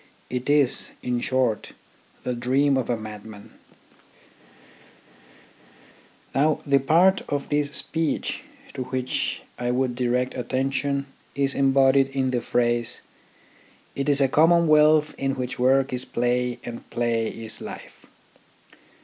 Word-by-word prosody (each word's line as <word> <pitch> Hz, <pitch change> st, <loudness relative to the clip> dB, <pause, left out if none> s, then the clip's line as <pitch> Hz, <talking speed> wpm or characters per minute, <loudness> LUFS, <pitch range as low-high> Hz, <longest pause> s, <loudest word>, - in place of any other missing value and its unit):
It 125 Hz, +2 st, -3 dB
is, 145 Hz, -3 st, +2 dB
in 125 Hz, -1 st, -1 dB
short, 125 Hz, -3 st, -1 dB, 0.5 s
the 125 Hz, -, -2 dB
dream 135 Hz, +4 st, +2 dB
of 130 Hz, -2 st, -1 dB
a 120 Hz, -, +1 dB
madman." 110 Hz, -1 st, -10 dB, 2.8 s
Now 150 Hz, +2 st, +2 dB
the 140 Hz, -1 st, +4 dB
part 175 Hz, +7 st, +4 dB
of 145 Hz, -1 st, -3 dB
this 145 Hz, -1 st, +1 dB
speech 160 Hz, -2 st, -1 dB, 0.3 s
to 130 Hz, -2 st, -4 dB
which 130 Hz, 0 st, -2 dB, 0.2 s
I 120 Hz, 0 st, -1 dB
would 125 Hz, 0 st, 0 dB
direct 125 Hz, +1 st, 0 dB
attention 135 Hz, +2 st, -1 dB, 0.3 s
is 140 Hz, 0 st, 0 dB
embodied 135 Hz, 0 st, +4 dB
in 135 Hz, -1 st, -1 dB
the 120 Hz, -2 st, 0 dB
phrase, 120 Hz, -1 st, 0 dB, 0.5 s
" -, -, -30 dB
It 140 Hz, +1 st, -1 dB
is 140 Hz, -1 st, +3 dB
a 135 Hz, -, +5 dB
commonwealth 155 Hz, 0 st, +4 dB
in 135 Hz, 0 st, -1 dB
which 130 Hz, 0 st, -5 dB
work 135 Hz, +1 st, +3 dB
is 125 Hz, 0 st, -2 dB
play 125 Hz, 0 st, -1 dB
and 120 Hz, -1 st, -8 dB
play 115 Hz, -1 st, 0 dB
is 115 Hz, 0 st, -6 dB
life." -, -, -10 dB
130 Hz, 125 wpm, -24 LUFS, 125-140 Hz, 2.8 s, a